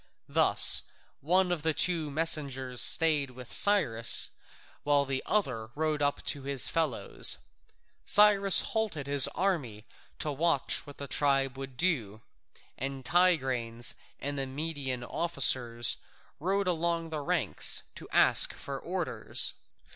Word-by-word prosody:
Thus - - +4 0.3
one 180 +4 0
of 175 -3 -3
the 160 0 -2
two 165 -4 0
messengers 140 -5 0
stayed 155 -4 +2
with 125 -1 -11
Cyrus 120 - +3 0.5
while 145 -1 0
the 135 -1 -4
other 125 - -2
rode 155 -1 -2
up 145 0 -2
to 140 - -4
his 135 -1 +2
fellows. 160 -7 -1 0.7
Cyrus 200 -2 +5
halted 215 -11 -4
his 140 -1 +4
army 145 - -3 0.3
to 150 - -3
watch 150 -1 -1
what 145 - -13
the 140 - -8
tribe 135 -2 0
would 135 -1 -10
do, 115 - -2 0.6
and 135 0 -6
Tigranes 130 -10 0 0.3
and 145 0 -4
the 135 - -4
Median 135 -3 -5
officers 120 -6 +1 0.4
rode 195 +5 -2
along 170 -1 -2
the 155 - -4
ranks 140 - +3
to - - -12
ask - - +5
for - - -8
orders. - - -1
145 Hz, 125 wpm, -28 LUFS, 130-165 Hz, 0.7 s, Cyrus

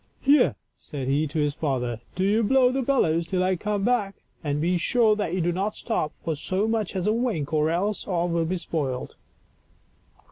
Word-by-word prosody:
" - - -41
Here," 280 -1 +4 0.2
said 135 -4 -6
he 145 +3 +1
to 155 +3 -5
his 150 -1 +1
father, 125 -6 -2
" - - -32
do 185 - 0
you 210 +4 +3
blow 250 +3 +4
the 265 +1 0
bellows 170 - +1
till 185 +1 0
I 185 0 +2
come 205 +2 -2
back, 210 -4 +1 0.3
and 145 -1 -1
be 175 +3 +1
sure 220 +3 +3
that 205 -5 -2
you 185 - 0
do 175 +1 +1
not 195 +4 -2
stop 155 -10 -2
for 160 - -3
so 190 +8 -1
much 220 -4 -1
as 185 -1 -1
a 210 - +3
wink, 220 - -1
or 155 0 +2
else 195 +5 -1
all 175 -2 0
will 170 -1 0
be 185 +3 -1
spoiled." 140 -7 -3
180 Hz, 215 wpm, -25 LUFS, 155-215 Hz, 0.3 s, Here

